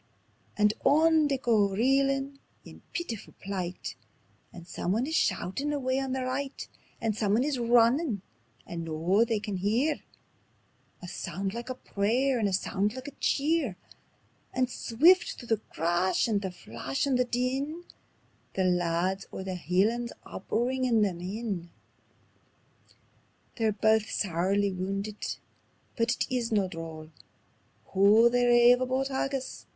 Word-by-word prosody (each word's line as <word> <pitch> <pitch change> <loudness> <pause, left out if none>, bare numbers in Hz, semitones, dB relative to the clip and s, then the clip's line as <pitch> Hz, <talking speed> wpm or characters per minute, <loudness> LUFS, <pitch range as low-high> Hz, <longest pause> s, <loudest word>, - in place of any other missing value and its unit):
And 210 0 +4
on 315 +1 +4
they 275 -1 0
go 220 -6 +2
reelin' 275 +5 +1 0.3
in - - -13
peetifu' 235 - -5
plight, 185 -2 -4 0.6
And 170 -1 -12
someone 190 +7 -1
is 315 - -4
shoutin' 275 - 0
away 265 -2 0
on 270 -1 -3
their 260 -1 -2
right; 270 +2 -4 0.3
And 225 -3 -1
someone 215 +2 +2
is 285 -3 -1
runnin', 235 - +3 0.4
and 170 -1 -5
noo 165 +7 +2
they 225 -2 0
can 205 -2 -4
hear 235 +11 +1 1.0
A - - -6
sound 190 +3 -4
like 235 +2 -6
a 255 - -3
prayer 245 +5 0
and 215 - +2
a - - -3
sound 200 +3 0
like 260 +1 -7
a 280 - -21
cheer; 285 - +1 0.8
And 255 -1 +1
swift 330 +14 +4
through 240 - -12
the 225 - +3
crash 175 0 0
and 210 -3 +1
the 190 - -3
flash 135 - -4
and 275 -2 +1
the - - +5
din, 265 +7 -2 0.7
The 190 - +1
lads 180 +1 0
o' - - -6
the 190 0 -4
Hielands 200 +8 0
are - - -8
bringin' 240 +2 +1
them 185 -4 -1
in. 190 -2 -4 1.9
"They're 225 -2 +2
baith 220 +1 +2
sairly 195 +2 0
woundit, 195 +3 -4 0.6
but 235 +1 +1
is 245 -2 -1
it - - +2
no 200 -2 +2
droll 165 -3 -8 0.8
Hoo 205 +4 +6
they 245 0 +3
rave 240 +1 +6
aboot 260 +1 0
haggis?" 270 0 -3
225 Hz, 140 wpm, -28 LUFS, 190-260 Hz, 1.9 s, Hoo